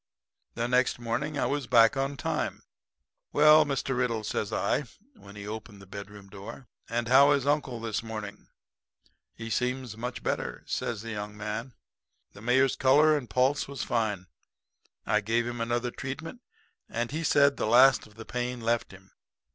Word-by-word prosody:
"The 120 Hz, 0 st, -1 dB
next 125 Hz, +1 st, +2 dB
morning 120 Hz, +6 st, -3 dB
I -, -, +1 dB
was 145 Hz, -2 st, -2 dB
back 115 Hz, -1 st, +5 dB
on 135 Hz, +1 st, -2 dB
time. -, -, -2 dB, 0.7 s
'Well, 150 Hz, +1 st, +7 dB
Mr. 135 Hz, -2 st, -2 dB
Riddle,' 120 Hz, -3 st, 0 dB
says 105 Hz, -1 st, -2 dB
I, 140 Hz, +8 st, 0 dB, 0.3 s
when 100 Hz, -, -14 dB
he 100 Hz, 0 st, -8 dB
opened 105 Hz, -1 st, -7 dB
the 95 Hz, -, -13 dB
bedroom 100 Hz, +1 st, -10 dB
door, 105 Hz, +7 st, -10 dB, 0.2 s
'and 115 Hz, 0 st, -1 dB
how 140 Hz, +3 st, +6 dB
is 140 Hz, -2 st, 0 dB
uncle 145 Hz, -4 st, 0 dB
this 110 Hz, -2 st, -2 dB
morning?' 110 Hz, -2 st, -7 dB, 0.9 s
"'He 115 Hz, 0 st, -7 dB
seems 125 Hz, -1 st, -1 dB
much 125 Hz, +2 st, -5 dB
better,' -, -, -3 dB
says 115 Hz, -2 st, -3 dB
the 115 Hz, -, -6 dB
young 105 Hz, 0 st, -6 dB
man. 105 Hz, +3 st, -5 dB, 0.6 s
"The 100 Hz, -, -13 dB
mayor's 125 Hz, +3 st, +3 dB
color 150 Hz, +4 st, +5 dB
and 130 Hz, -6 st, -4 dB
pulse 130 Hz, +6 st, +1 dB
was 140 Hz, -1 st, -5 dB
fine. 105 Hz, -5 st, -1 dB, 0.8 s
I 105 Hz, -, +2 dB
gave 115 Hz, +3 st, 0 dB
him 120 Hz, -1 st, -4 dB
another 120 Hz, +1 st, -1 dB
treatment, 155 Hz, -, -7 dB, 0.5 s
and 120 Hz, +1 st, -2 dB
he 160 Hz, +3 st, -3 dB
said 140 Hz, -2 st, +4 dB
the -, -, -1 dB
last 130 Hz, +3 st, +6 dB
of 105 Hz, -, -21 dB
the 110 Hz, 0 st, -10 dB
pain 125 Hz, +1 st, -3 dB
left 115 Hz, 0 st, -1 dB
him. 95 Hz, 0 st, -16 dB
120 Hz, 170 wpm, -28 LUFS, 110-135 Hz, 0.9 s, Well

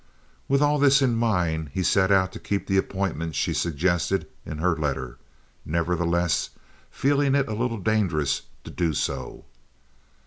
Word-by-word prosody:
With 140 Hz, +1 st, +3 dB
all 145 Hz, 0 st, +2 dB
this 140 Hz, 0 st, +5 dB
in 125 Hz, -3 st, +2 dB
mind 90 Hz, -9 st, 0 dB
he 95 Hz, -, 0 dB
set 95 Hz, +1 st, +3 dB
out 95 Hz, -1 st, +3 dB
to -, -, -9 dB
keep 100 Hz, -1 st, -2 dB
the 95 Hz, -, +1 dB
appointment 95 Hz, -5 st, -2 dB
she -, -, 0 dB
suggested 85 Hz, +2 st, 0 dB, 0.2 s
in 80 Hz, -, -5 dB
her 85 Hz, +2 st, +1 dB
letter, 70 Hz, -5 st, -3 dB, 0.4 s
nevertheless 85 Hz, 0 st, 0 dB, 0.4 s
feeling 140 Hz, 0 st, +1 dB
it 140 Hz, -1 st, +2 dB
a 110 Hz, -, -3 dB
little 115 Hz, +1 st, -1 dB
dangerous 95 Hz, -9 st, 0 dB, 0.2 s
to -, -, -9 dB
do 85 Hz, -3 st, 0 dB
so. -, -, -4 dB
95 Hz, 150 wpm, -25 LUFS, 80-115 Hz, 0.4 s, this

